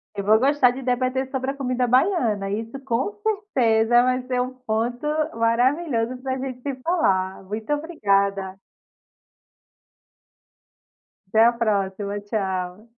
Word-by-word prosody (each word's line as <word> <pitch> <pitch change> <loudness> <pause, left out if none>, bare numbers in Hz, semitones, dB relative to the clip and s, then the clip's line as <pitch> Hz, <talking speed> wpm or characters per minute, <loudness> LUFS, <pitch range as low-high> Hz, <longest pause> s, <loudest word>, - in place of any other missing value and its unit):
Eu 200 - -3
vou 215 +2 +5
gostar 270 -1 +4
de 265 +2 -7
debater 255 +1 -1
sobre 265 0 -2
a - - -7
comida 250 -2 0
baiana. 240 - +2
Isso 225 +6 -4
com 265 - -1
certeza 240 - +2
vai 255 0 +1
ser 250 -1 0
um 255 +1 -3
ponto 240 +1 -3 0.3
maravilhoso 245 +2 +1
pra 260 0 -2
gente 255 -1 -6
se 280 -1 -3
falar. 190 - 0
Muito 215 +6 -5
obrigada. 200 - 0 2.7
Até 220 +3 +4
a 240 - +6
próxima, 205 -2 -1
tchau. 190 0 -3
240 Hz, 125 wpm, -23 LUFS, 210-260 Hz, 2.7 s, a